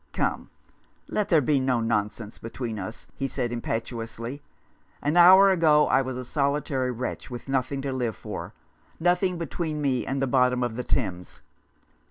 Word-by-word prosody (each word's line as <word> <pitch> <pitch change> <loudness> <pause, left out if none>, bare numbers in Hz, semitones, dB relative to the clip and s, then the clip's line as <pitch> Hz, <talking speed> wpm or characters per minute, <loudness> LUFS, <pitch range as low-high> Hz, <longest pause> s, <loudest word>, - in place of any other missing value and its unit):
" - - -40
Come, - - -1 0.6
let 210 -1 -1
there 165 -5 +5
be 140 +1 +2
no 130 -2 +1
nonsense 110 -1 -2
between 115 -1 -5
us," 100 +5 -7
he 135 - -3
said 125 -3 -3
impetuously. 115 +2 -4 0.3
" - - -36
An 145 +3 +1
hour 190 +3 +8
ago 155 -4 +4
I 135 - +4
was 130 -1 -4
a 130 - -5
solitary 140 -1 0
wretch, 125 +2 -4
with 120 0 -8
nothing 135 +1 -1
to 135 -1 -2
live 120 -4 -2
for, - - -7 0.5
nothing 180 +2 +2
between 165 -2 -3
me 130 -4 0
and 135 +1 -1
the 135 - +1
bottom 125 -1 +2
of 120 -2 -2
the 125 - -3
Thames. 90 -11 -3
130 Hz, 175 wpm, -26 LUFS, 120-150 Hz, 0.6 s, hour